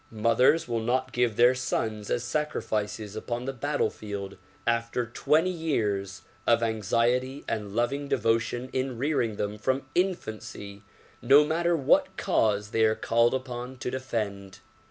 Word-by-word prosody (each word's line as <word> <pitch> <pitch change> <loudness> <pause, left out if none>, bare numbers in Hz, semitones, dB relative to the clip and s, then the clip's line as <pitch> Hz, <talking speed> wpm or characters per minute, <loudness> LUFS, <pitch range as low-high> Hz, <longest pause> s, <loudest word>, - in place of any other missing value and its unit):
Mothers 115 +8 +3
will 120 -1 -1
not 130 +3 0
give 120 -2 +1
their 120 +3 +6
sons 110 -4 -2
as 120 - 0
sacri 150 +4 -2
fices 105 -1 -3
upon 120 +2 -4
the 135 - -3
battlefield 105 -8 -3 0.3
after 120 +1 0
twenty 155 +9 +1
years 105 - -2 0.2
of 115 0 +4
anxiety 120 +5 0
and 105 -2 -3
loving 135 +5 0
devotion 115 +1 0
in 130 -2 -2
rearing 125 -5 0
them 105 +1 -3
from 130 +4 0
infancy, 110 - -3 0.4
no 140 +4 +6
matter 170 +2 +1
what 135 - +2
cause 105 -2 +1
they 115 - +2
are 110 0 +4
called 115 +3 +2
upon 130 0 -5
to 125 - -4
defend. 105 -7 -4
120 Hz, 140 wpm, -27 LUFS, 110-130 Hz, 0.4 s, their